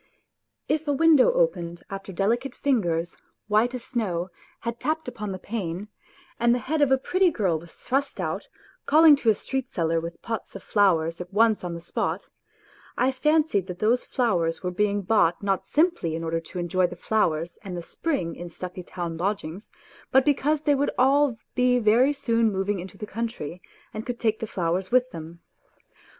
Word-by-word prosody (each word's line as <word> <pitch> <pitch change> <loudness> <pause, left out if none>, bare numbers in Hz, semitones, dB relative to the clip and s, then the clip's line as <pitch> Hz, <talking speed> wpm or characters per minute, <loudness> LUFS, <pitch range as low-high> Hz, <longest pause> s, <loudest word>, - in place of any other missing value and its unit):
If 310 +1 0
a 290 - +2
window 320 - +5
opened 175 - 0
after 195 0 -6
delicate 235 +8 0
fingers, 175 -11 0 0.3
white 220 +4 +2
as 245 - -6
snow, 185 -7 -2 0.3
had 235 0 -4
tapped 310 +3 -2
upon 210 -4 -5
the 190 - -4
pane, 195 -1 -4 0.5
and 235 +1 +4
the 245 - -5
head 310 +2 0
of 285 - +4
a 265 - +6
pretty 370 +7 +2
girl 190 - 0
was 170 +1 -14
thrust 275 +2 -2
out, - - -3 0.4
calling 310 0 +8
to 235 - +1
a 215 - +5
street 265 +3 -3
seller 165 -1 0
with 170 0 -7
pots 225 -3 -5
of 195 - -8
flowers 170 -5 +2
at 180 +1 -8
once 220 0 +3
on 175 -1 -4
the - - -6
spot 175 - -3 0.7
I 255 +2 +3
fancied 295 - +2
that 180 - -6
those 230 +5 +2
flowers 175 -10 0
were 180 - -1
being 205 +2 0
bought 180 -3 +2
not 195 -1 0
simply 310 - +1
in 165 - -4
order 165 0 -1
to 165 +2 -10
enjoy 180 +1 +1
the 175 - -8
flowers 170 -4 0
and 185 -3 -5
the 170 - -5
spring 270 - -2
in 175 0 -7
stuffy 180 +2 -7
town 170 -2 -5
lodgings, 190 0 -3 0.4
but 265 0 +5
because 295 +1 +1
they 295 - +4
would 280 +1 +1
all 270 -1 +4 0.2
be 250 0 +3
very 240 +4 +4
soon 230 -5 +1
moving 195 0 -1
into 190 +2 -9
the 210 - -5
country 210 -7 -5 0.3
and 215 - -4
could 245 0 -5
take 220 -2 +1
the 225 - -4
flowers 180 -1 -1
with 255 +1 +3
them. 165 -1 -9
210 Hz, 185 wpm, -25 LUFS, 175-255 Hz, 0.7 s, calling